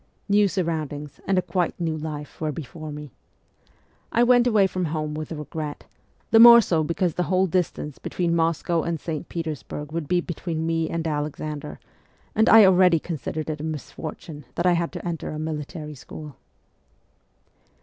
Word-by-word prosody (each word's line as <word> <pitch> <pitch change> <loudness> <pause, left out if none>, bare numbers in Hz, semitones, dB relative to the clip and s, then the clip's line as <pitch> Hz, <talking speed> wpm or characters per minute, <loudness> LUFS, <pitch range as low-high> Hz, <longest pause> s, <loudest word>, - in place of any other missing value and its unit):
New 205 0 +4
surroundings 155 -6 -3
and 195 -1 +2
a 185 - +2
quite 180 -2 -1
new 165 -2 -1
life 150 -1 -7
were 155 -1 0
before 155 +1 -7
me. 150 -2 -8 1.0
I 235 - +4
went 245 0 +5
away 215 -4 +4
from 185 -1 -1
home 155 -1 -2
with 155 +1 -5
regret, 150 -1 -5 0.5
the 225 - +7
more 235 0 +11
so 165 -8 +1
because 170 +2 0
the 180 - -1
whole 185 0 +3
distance 165 -5 -2
between 170 -2 -1
Moscow 165 0 +1
and 165 -1 -2
St. 160 +1 -5
Petersburg 155 -2 -5
would 165 -2 -3
be 180 +3 +2
between 165 -1 -4
me 165 -1 0
and 165 -1 -3
Alexander, 150 - -4 0.5
and 220 - +3
I 220 -2 +9
already 180 -2 +5
considered 155 -1 -4
it 155 -1 -4
a - - -6
misfortune 155 0 -7
that 170 - -1
I 180 - +5
had 170 -1 0
to - - -6
enter 165 -2 -4
a 155 - -5
military 155 0 -5
school. 150 +1 -10
160 Hz, 170 wpm, -24 LUFS, 150-180 Hz, 1.0 s, more